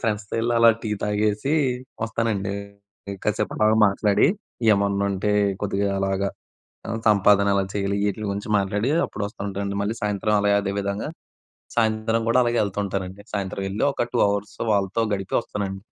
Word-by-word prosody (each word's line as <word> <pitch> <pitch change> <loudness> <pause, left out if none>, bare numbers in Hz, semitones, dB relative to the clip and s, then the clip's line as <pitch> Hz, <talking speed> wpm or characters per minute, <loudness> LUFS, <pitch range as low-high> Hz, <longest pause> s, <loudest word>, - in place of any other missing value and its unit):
ఫ్రెండ్స్‌తో 105 -2 -2
ఎళ్లి 120 +1 0
అలా 115 0 +7
టీ 110 - -3
తాగేసి 105 +5 0 0.5
వస్తానండి. 110 -3 -1 0.6
ఇంకా 95 - -1
కాసేపు - - -2
అలాగా 110 +1 +3
మాట్లాడి 100 +1 +3 0.5
ఏమన్నుంటే 100 0 +1 0.3
కొద్దిగా 100 0 0
అలాగా 95 0 0 0.6
ఆ! - - -3 0.2
సంపాదన 100 -1 +4
ఎలా 100 -1 +2
చేయాలి? 100 0 0
ఈటిల 105 +2 -4
గురించి 100 +2 -4
మాట్లాడి 105 +6 0 0.2
అప్పుడు 105 - -7
వస్తా 100 - -12
ఉంటానండి. 100 0 -3
మళ్ళీ 105 +3 -2
సాయంత్రం 105 0 0
అలాగే 100 0 +3
అదే 100 0 -2
విధంగా 100 +6 -3 0.7
సాయంత్రం 110 0 +1
గూడా 115 +2 +4
అలాగే 120 0 +1
ఎళ్తూ 100 -1 -3
ఉంటానండి. 95 0 -4
సాయంత్రం 100 -1 -3
వెళ్లి 100 +2 -2
ఒక 120 - -2
2 120 - +1
హవర్స్ 100 +1 -3
వాళ్ళతో 100 +2 +1
గడిపి 95 -1 -4
వస్తానండి. 95 -3 -4
100 Hz, 155 wpm, -23 LUFS, 100-110 Hz, 0.7 s, అలా